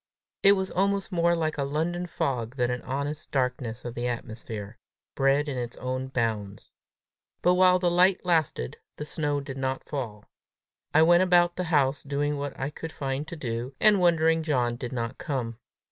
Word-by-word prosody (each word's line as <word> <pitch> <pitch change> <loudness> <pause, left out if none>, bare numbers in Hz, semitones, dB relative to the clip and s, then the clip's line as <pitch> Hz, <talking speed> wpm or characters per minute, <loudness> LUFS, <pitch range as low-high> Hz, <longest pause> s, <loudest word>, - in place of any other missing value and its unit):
It 200 - +7
was 190 -1 -1
almost 195 +1 0
more 170 -1 +3
like 155 -2 -1
a - - +1
London 165 +5 -1
fog 125 -7 -2
than 125 -2 +1
an 125 -1 -3
honest 140 +3 -4
darkness 125 -3 -2
of 120 - -4
the 120 +1 -2
atmosphere, 110 -3 -6 0.3
bred 135 +2 +2
in 135 -3 -2
its 120 -1 -5
own 130 +1 -3
bounds. 110 -6 -3 0.7
But 180 - +5
while 180 0 +5
the 180 -1 +1
light 180 +2 +3
lasted, 160 - 0 0.2
the 150 - -6
snow 145 -1 -1
did 135 -1 -7
not 130 0 -2
fall. 115 -8 -5 0.7
I 155 - +6
went 175 +2 +6
about 175 -1 +4
the 180 - -2
house 145 -4 +2
doing 145 +1 -1
what 140 -1 -5
I 135 +2 -2
could 160 +2 -7
find 135 +1 -3
to 170 - -6
do, 125 -2 -4
and 210 -2 +6
wondering 165 -2 +3
John 125 -7 0
did 120 0 -6
not 120 0 -4
come. 120 -5 -3
140 Hz, 180 wpm, -27 LUFS, 125-170 Hz, 0.7 s, It